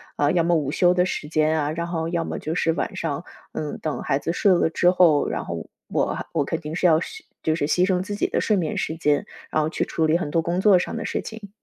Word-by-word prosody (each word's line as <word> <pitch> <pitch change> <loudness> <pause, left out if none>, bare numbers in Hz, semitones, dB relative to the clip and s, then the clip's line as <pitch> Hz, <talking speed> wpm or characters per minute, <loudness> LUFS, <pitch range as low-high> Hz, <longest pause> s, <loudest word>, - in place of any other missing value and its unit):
啊， 145 0 +2
要 170 -2 +2
么 175 +1 +2
午 145 -3 0
休 180 +2 +4
的 180 0 +2
时 150 - -4
间 155 0 +2
啊， 150 +1 -1
然 170 +2 -3
后 165 -1 -2
要 170 -1 -1
么 - - -4
就 155 - -4
是 165 -1 +1
晚 - - -3
上， 160 0 -3 0.3
嗯， 150 -2 -4
等 155 - -2
孩 135 - +1
子 165 - -2
睡 195 +2 +3
了 170 - +2
之 175 +2 +3
后， 170 -5 +4
然 - - -2
后 - - -6 0.2
我 - - 0
还 - - -4
我 145 -4 +1
肯 165 - -2
定 155 +1 -5
是 180 - -1
要 160 -2 +6
休 365 - -7 0.2
就 160 0 +1
是 145 - -1
牺 180 +4 +2
牲 185 -1 +2
自 205 - -5
己 - - 0
的 - - -1
睡 215 - +2
眠 170 -5 -1
时 160 - -2
间， 150 -3 +1 0.2
然 155 - 0
后 150 - 0
去 - - -1
处 160 - -1
理 155 +1 +3
很 145 - -3
多 165 - +1
工 175 +3 -1
作 200 -3 +6
上 - - -2
的 - - -3
事 - - -2
情。 220 -3 -9
165 Hz, 305 characters per minute, -23 LUFS, 155-180 Hz, 0.3 s, 要